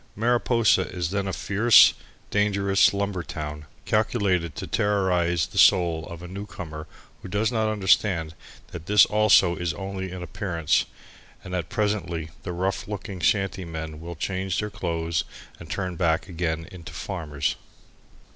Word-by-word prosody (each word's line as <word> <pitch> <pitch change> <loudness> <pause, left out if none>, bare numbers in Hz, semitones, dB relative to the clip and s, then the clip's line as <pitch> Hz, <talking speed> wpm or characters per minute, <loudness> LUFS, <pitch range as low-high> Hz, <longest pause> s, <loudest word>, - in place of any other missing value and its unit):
Mariposa 115 -3 +2
is 90 -2 -3
then 100 -1 -1
a - - -1
fierce, 105 +5 +5 0.4
dangerous 100 -1 +3
lumber 100 -2 -2
town, 75 -3 -6 0.2
calculated 95 - +1
to - - -5
terrorize 90 -5 +1
the - - -3
soul 85 -4 +4
of 85 -1 -9
a - - -7
newcomer 90 -5 -7 0.3
who - - -8
does 105 +4 0
not 110 -2 +1
understand 95 -5 +2 0.4
that 85 0 -8
this 105 0 +7
also 105 -4 +4
is 85 -1 -2
only 95 -1 -5
an 90 -1 -6
appearance 85 -3 0 0.6
and 90 - -8
that 85 -2 -2
presently 85 -7 -2
the - - -5
rough 95 +2 -2
looking 100 -2 -6
shanty 95 +1 +1
men 80 -2 -6
will 85 +1 -7
change 95 +3 -2
their 105 0 -2
clothes 85 -3 -2 0.4
and 85 - -11
turn 90 0 -3
back 85 -1 +1
again 80 -2 -3
into 90 -3 -10
farmers. 75 -3 -3
90 Hz, 145 wpm, -25 LUFS, 85-100 Hz, 0.6 s, this